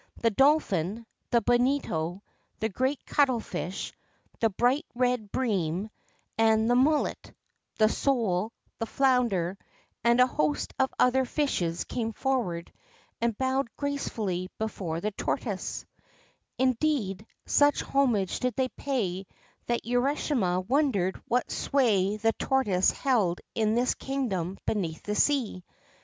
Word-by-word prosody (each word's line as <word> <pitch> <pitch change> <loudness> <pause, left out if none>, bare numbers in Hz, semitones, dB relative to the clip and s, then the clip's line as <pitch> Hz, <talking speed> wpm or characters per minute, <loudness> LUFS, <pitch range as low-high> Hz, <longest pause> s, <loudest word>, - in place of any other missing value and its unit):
The 230 - +2
dolphin, 225 - +2 0.2
the 235 -1 +3
bonito, 240 - +1 0.4
the 220 - 0
great 260 +7 -1
cuttle 265 -5 +2
fish, 185 -2 -5 0.5
the 225 - +3
bright 245 - +1
red 245 -4 0
bream; 200 -4 -1 0.5
and 220 0 +4
the 245 - +3
mullet, 290 +4 +1 0.5
the 215 - +5
sole, 220 -5 0 0.3
the 225 - -2
flounder, 230 -10 +1 0.4
and 235 +1 +4
a 250 - +8
host 150 - -1
of 265 0 +2
other 260 +1 +4
fishes 240 - -1
came 225 -2 -3
forward 215 -11 -2 0.5
and 230 -2 0
bowed 260 -1 0
gracefully 215 -10 -2
before 185 -7 -3
the 210 - -1
tortoise; - - -3 0.7
indeed, 255 -6 +1 0.2
such 290 0 +4
homage 240 -9 +1
did 250 -3 -1
they 260 -1 0
pay 195 -11 -2 0.4
that 240 0 -1
Urashima 245 - +1
wondered 250 -10 +1
what 245 +1 0
sway 210 -7 +2
the 225 +1 +2
tortoise 210 -9 +2
held 215 -11 +1
in 220 -1 +1
this 245 +1 +2
kingdom 195 -10 -3
beneath 170 -7 -2
the 210 - -2
sea. 235 -6 +1
230 Hz, 120 wpm, -28 LUFS, 195-260 Hz, 0.7 s, a